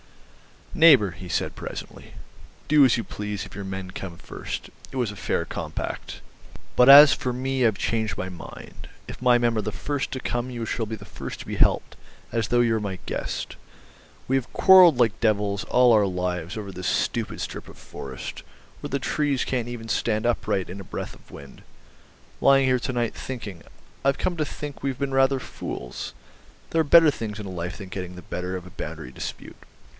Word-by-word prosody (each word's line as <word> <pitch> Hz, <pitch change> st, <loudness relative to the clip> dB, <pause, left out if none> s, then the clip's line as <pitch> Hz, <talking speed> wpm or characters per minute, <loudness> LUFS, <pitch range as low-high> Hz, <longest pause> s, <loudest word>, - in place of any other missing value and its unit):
"Neighbour," 140 Hz, -, +6 dB
he 90 Hz, 0 st, -10 dB
said -, -, -1 dB
presently, -, -, -8 dB, 0.6 s
"do 150 Hz, -1 st, +7 dB
as 125 Hz, -, +4 dB
you 115 Hz, -, -2 dB
please 105 Hz, -1 st, -5 dB
if -, -, -13 dB
your 100 Hz, 0 st, -6 dB
men 95 Hz, -1 st, -5 dB
come 90 Hz, -2 st, -7 dB
first. -, -, -7 dB, 0.2 s
It -, -, -10 dB
was 120 Hz, -5 st, 0 dB
a -, -, -10 dB
fair -, -, -1 dB
compact. -, -, -5 dB, 0.6 s
But 125 Hz, -, +6 dB
as 145 Hz, +1 st, +11 dB
for 125 Hz, -, -2 dB
me, 130 Hz, 0 st, +1 dB
I've 110 Hz, -3 st, 0 dB
changed 110 Hz, 0 st, -1 dB
my 95 Hz, -, -3 dB
mind. 90 Hz, -3 st, -10 dB, 0.2 s
If -, -, -9 dB
my 125 Hz, -1 st, +5 dB
men 120 Hz, -1 st, +1 dB
are -, -, +2 dB
the 105 Hz, 0 st, -4 dB
first 145 Hz, +3 st, -3 dB
to 130 Hz, -, -3 dB
come 120 Hz, +1 st, -2 dB
you 120 Hz, -2 st, -4 dB
shall 115 Hz, 0 st, -2 dB
be 110 Hz, -, -4 dB
the 100 Hz, -, -12 dB
first -, -, -7 dB
to -, -, -9 dB
be -, -, -5 dB
helped, -, -, +2 dB, 0.3 s
as 115 Hz, -2 st, 0 dB
though 120 Hz, 0 st, +3 dB
you 115 Hz, -1 st, +3 dB
were 110 Hz, -, +1 dB
my 100 Hz, -3 st, -4 dB
guest. -, -, -4 dB, 0.7 s
We 135 Hz, -, +3 dB
have 130 Hz, -, -4 dB
quarrelled 185 Hz, -6 st, +8 dB
like 115 Hz, -4 st, +2 dB
devils 105 Hz, -2 st, +1 dB
all 125 Hz, -1 st, +5 dB
our 105 Hz, -3 st, +5 dB
lives 90 Hz, 0 st, -3 dB
over 100 Hz, -2 st, -5 dB
this 90 Hz, 0 st, -5 dB
stupid -, -, -1 dB
strip -, -, -6 dB
of -, -, -13 dB
forest, 65 Hz, -1 st, -8 dB, 0.4 s
where -, -, -6 dB
the 140 Hz, -, 0 dB
trees 140 Hz, 0 st, 0 dB
can't 125 Hz, -3 st, -2 dB
even 115 Hz, -2 st, -7 dB
stand 110 Hz, 0 st, 0 dB
upright 100 Hz, -6 st, 0 dB
in 95 Hz, +3 st, -7 dB
a -, -, -7 dB
breath -, -, -6 dB
of -, -, -19 dB
wind. 70 Hz, -1 st, -12 dB, 0.8 s
Lying 135 Hz, 0 st, +5 dB
here 130 Hz, -1 st, +3 dB
to 130 Hz, -, -3 dB
night 120 Hz, -2 st, 0 dB
thinking 105 Hz, -9 st, -7 dB, 0.4 s
I've 140 Hz, 0 st, +3 dB
come 175 Hz, -1 st, -1 dB
to 155 Hz, -, 0 dB
think 145 Hz, -1 st, -7 dB
we've 135 Hz, -2 st, -2 dB
been 140 Hz, -1 st, -2 dB
rather 135 Hz, 0 st, +3 dB
fools; 60 Hz, -, -6 dB, 0.6 s
there 165 Hz, -, +3 dB
are -, -, -1 dB
better 160 Hz, +1 st, +7 dB
things 110 Hz, -5 st, -5 dB
in 95 Hz, -3 st, -6 dB
life 90 Hz, +1 st, -4 dB
than 100 Hz, -3 st, -9 dB
getting 90 Hz, -1 st, -6 dB
the 90 Hz, -, -10 dB
better 90 Hz, +1 st, -4 dB
of 90 Hz, -1 st, -6 dB
a 90 Hz, -, -12 dB
boundary 65 Hz, -, -7 dB
dispute. -, -, -7 dB
115 Hz, 200 wpm, -25 LUFS, 95-130 Hz, 0.8 s, as